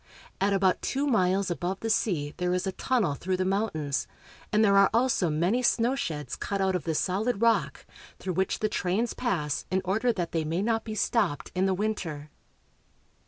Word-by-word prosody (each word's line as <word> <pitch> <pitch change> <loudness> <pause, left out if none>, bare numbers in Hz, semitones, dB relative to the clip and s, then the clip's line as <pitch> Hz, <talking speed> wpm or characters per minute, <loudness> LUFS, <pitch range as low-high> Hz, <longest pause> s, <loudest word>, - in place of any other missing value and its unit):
At 200 +1 +3
about 195 -2 +2
two 275 +2 -1
miles 195 -6 +2
above 175 +4 -3
the 225 - -2
sea 160 -10 0
there 180 0 0
is 180 - -1
a 190 - -1
tunnel 225 - 0
through 185 +6 -2
the 185 - 0
mountains, 185 -8 -1 0.4
and 215 0 +4
there 200 -1 +4
are 195 0 +6
also 230 -7 +2
many 175 +11 +1
snowsheds 230 - 0
cut 200 - -2
out 190 -1 +1
of 180 - -3
the 160 -2 -1
solid 200 +7 0
rock, 230 0 +1 0.3
through 185 - -4
which 190 +2 -1
the 215 - +2
trains 210 +3 -1
pass 165 - -2
in 190 - +1
order 220 +6 +1
that 180 -6 -3
they 165 -1 0
may 165 +5 -1
not 225 0 0
be 215 -1 -5
stopped 200 - 0
in 185 +1 +1
the 190 - +1
winter. 170 -8 -3
190 Hz, 190 wpm, -27 LUFS, 175-220 Hz, 0.4 s, are